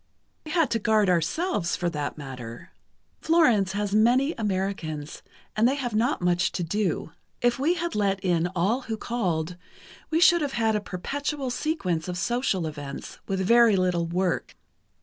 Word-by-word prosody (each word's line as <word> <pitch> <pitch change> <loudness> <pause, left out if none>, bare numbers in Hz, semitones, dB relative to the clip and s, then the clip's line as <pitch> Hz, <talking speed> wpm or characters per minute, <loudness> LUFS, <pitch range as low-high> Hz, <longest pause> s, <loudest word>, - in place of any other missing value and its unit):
"We 305 - -6
had 330 -4 +2
to 230 - +1
guard 215 -3 +3
ourselves, 175 - 0
for 175 - -2
that 150 -2 -4
matter. 125 -5 -8 0.5
Florence 245 - +3
has 205 0 -2
many 245 +8 +4
Americans, 190 -8 -3 0.3
and 220 +2 +4
they 265 - +1
have 250 -5 -3
not 230 -1 +1
much 175 0 +2
to 180 - -2
do. 180 -2 -1 0.3
If 245 +2 +1
we 320 +6 +2
had 345 -1 -3
let 200 -2 +1
in 175 -2 +1
all 200 +9 +1
who 225 -3 -4
called, 180 -8 -2 0.5
we 320 +1 +1
should 345 0 +6
have 285 -2 -2
had 225 -2 +1
a 210 - 0
perpetual 275 +8 -3
sequence 195 - -1
of 180 0 -3
social 205 -3 0
events, 145 -3 -7
with 190 -1 -1
very 230 +2 +5
little 180 -2 +1
work. 180 +1 -1
205 Hz, 165 wpm, -26 LUFS, 175-245 Hz, 0.5 s, should